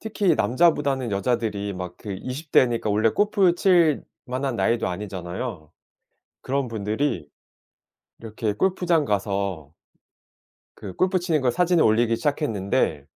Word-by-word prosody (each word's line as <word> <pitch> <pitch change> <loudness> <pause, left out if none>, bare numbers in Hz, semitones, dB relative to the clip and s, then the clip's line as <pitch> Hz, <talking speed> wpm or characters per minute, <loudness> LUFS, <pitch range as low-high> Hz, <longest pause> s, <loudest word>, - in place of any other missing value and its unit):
특히 205 -6 +1
남자보다는 140 -3 +1
여자들이 105 -1 -1
막 90 -2 -7
그 100 -3 -6
20 140 +4 -7
대니까 120 -4 +3
원래 110 +2 +3
골프 200 - +2
칠 175 -5 +3 0.2
만한 130 -1 -2
나이도 115 +5 +1
아니잖아요. 90 -1 -6 0.7
그런 135 -1 -1
분들이 110 - -2 0.9
이렇게 110 -1 -3
골프장 175 - +1
가서 100 - -2 1.0
그 95 -3 -9
골프 185 0 +1
치는 165 -4 0
걸 130 - +2
사진을 175 +2 +3
올리기 115 +1 +3
시작했는데 100 - -1
120 Hz, 280 characters per minute, -24 LUFS, 100-155 Hz, 1.0 s, 대니까